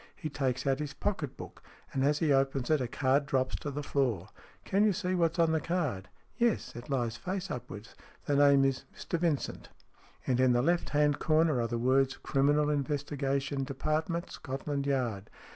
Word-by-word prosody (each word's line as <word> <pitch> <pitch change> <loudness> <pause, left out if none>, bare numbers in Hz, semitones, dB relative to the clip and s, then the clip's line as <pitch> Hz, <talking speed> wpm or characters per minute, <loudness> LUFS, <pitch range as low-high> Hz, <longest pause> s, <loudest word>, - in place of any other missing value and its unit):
He 155 - -5
takes 130 -4 -1
out 135 0 +1
his 150 -1 -4
pocket 160 -10 -3
book, - - -10 0.3
and 135 - 0
as 145 +1 +3
he 155 -3 +2
opens 135 0 +1
it 155 -3 +3
a 125 - -1
card 140 +3 +1
drops 130 -3 0
to 145 - -5
the 145 +1 -4
floor." 120 -11 0 0.2
" - - -28
Can 200 +2 +2
you 210 -2 +4
see 185 0 -2
what's 170 -2 +1
on 165 -1 +3
the 160 -1 +1
card? 145 - -2
" - - -37
"Yes. 235 -2 +1
It 120 +3 -9
lies 120 -4 -1
face 185 +3 -4
upwards. 115 -2 -7 0.3
The 145 - +1
name 140 -1 +6
is 135 -1 -1
' - - -29
Mr 170 - -3
Vincent.' 160 -5 -1 0.6
And 125 -1 +1
in 130 -1 +4
the 120 0 +2
left 175 +2 +1
hand 150 -1 +2
corner 155 -4 +3
are 115 - 0
the 120 - -2
words 130 +3 +2
'Criminal 145 +2 +2
Investigation 140 -1 -1
Department, 155 +5 -2
Scotland 140 0 -4
Yard.' 120 -7 -1
140 Hz, 195 wpm, -30 LUFS, 130-155 Hz, 0.6 s, name